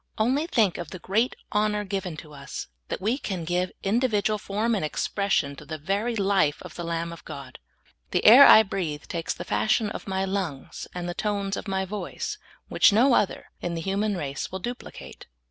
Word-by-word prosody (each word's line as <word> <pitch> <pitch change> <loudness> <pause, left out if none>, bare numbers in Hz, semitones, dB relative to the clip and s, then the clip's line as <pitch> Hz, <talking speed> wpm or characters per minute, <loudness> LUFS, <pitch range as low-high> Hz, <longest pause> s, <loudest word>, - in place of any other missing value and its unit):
Only 265 +8 +1
think 215 - +2
of 170 -3 -5
the 185 - -7
great 210 +8 0 0.2
honor 210 0 +1
given 190 -4 -3
to 150 -1 -11
us, 140 -1 -7 0.2
that - - -4
we 225 +8 0
can 185 - -4
give 180 +2 0
individ 215 0 +1
ual 215 0 +1
form 215 +4 -1
and 200 - 0
expression 155 -2 0
to - - -10
the 155 - -6
very 200 +10 -1
life 195 -8 +2
of - - -10
the 175 - -6
Lamb 170 0 -3
of 170 - -12
God. - - -9 0.5
The - - 0
air 255 +6 +11
I 220 - +9
breathe 170 -8 -3
takes 165 -1 -3
the - - -7
fashion 215 -1 +1
of - - -7
my 190 0 0
lungs 185 -8 -4
and 175 -1 -4
the 175 - -3
tones 200 0 -1
of - - -6
my 190 0 -1
voice 210 - -5 0.3
which - - +5
no 240 +6 +5
other 205 - 0
in 175 -1 -2
the 165 - -3
human 200 +3 0
race 140 -4 -4
will 190 - -3
duplicate. 240 +6 -8
195 Hz, 200 wpm, -26 LUFS, 175-215 Hz, 0.5 s, air